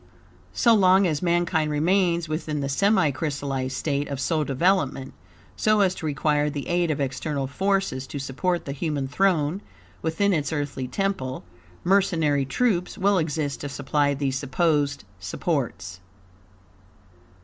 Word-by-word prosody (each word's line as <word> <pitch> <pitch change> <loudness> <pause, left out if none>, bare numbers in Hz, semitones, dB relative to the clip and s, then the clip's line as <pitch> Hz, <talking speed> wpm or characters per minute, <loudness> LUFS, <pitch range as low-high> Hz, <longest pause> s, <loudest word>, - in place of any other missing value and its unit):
So 235 -2 +5
long 190 -2 +5
as 155 -4 0
mankind 170 -3 +1
remain 170 +3 +2
within 155 -1 -3
the 140 - -2
semicrystallized 140 -6 0
state 145 +1 -1
of 140 -2 -4
soul 155 +3 0
development, 140 -2 0 0.4
so 215 -1 +3
as 190 -2 +3
to 160 - -5
require 150 0 +1
the 145 -1 -5
aid 175 -1 +1
of 150 - -1
external 140 +1 -2
forces 190 -3 -1
to 145 - -6
support 145 +6 -2
the 140 - -4
human 145 -1 -2
throne 170 +2 +1 0.4
within 190 +5 +1
its 150 -4 -1
earthly 145 -4 -3
temple, 130 -4 -2 0.4
mercenary 165 -7 +2
troops 180 - 0
will 200 -1 +3
exist 155 -3 -2
to 145 - -4
supply 145 +1 0
these 135 -1 -1
supposed 145 - 0 0.2
supports. 100 - -3
150 Hz, 135 wpm, -25 LUFS, 140-180 Hz, 0.4 s, So